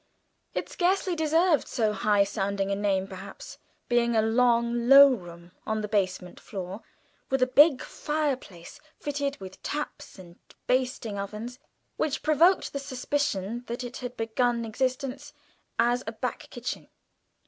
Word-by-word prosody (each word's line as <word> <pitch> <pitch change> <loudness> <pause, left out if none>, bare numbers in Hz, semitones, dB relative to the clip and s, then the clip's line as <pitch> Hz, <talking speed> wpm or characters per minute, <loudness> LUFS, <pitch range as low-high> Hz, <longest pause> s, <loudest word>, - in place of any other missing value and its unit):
It - - -2
scarcely 370 0 +1
deserved 320 0 +2
so 215 -3 0
high 205 0 +3
sounding 200 -1 -2
a - - +1
name 195 -2 0
perhaps, 195 - -10 0.3
being 235 -1 +2
a 220 - +5
long 235 +1 +2
low 275 0 +10
room 175 -5 -9
on 220 0 -2
the 210 - -3
basement 190 -3 -1
floor, 190 +1 -7 0.5
with 265 -1 +2
a - - +6
big 280 +2 +5
fireplace, 270 - -3 0.2
fitted 285 -1 -3
with 190 -1 -10
taps, 300 -6 -5
and 175 -2 -14 0.3
baking 250 -5 0
ovens, 215 +5 -6 0.4
which 305 -2 -1
provoked 325 +5 +3
the 280 - -2
suspicion 250 -5 -2
that 240 +2 -4
it 245 0 -6
had 245 -1 -7
begun 235 +1 0
existence 255 +4 -3 0.4
as 240 +2 +2
a 225 - -3
back 245 +3 -4
kitchen. 245 0 -5
240 Hz, 140 wpm, -27 LUFS, 200-275 Hz, 0.5 s, low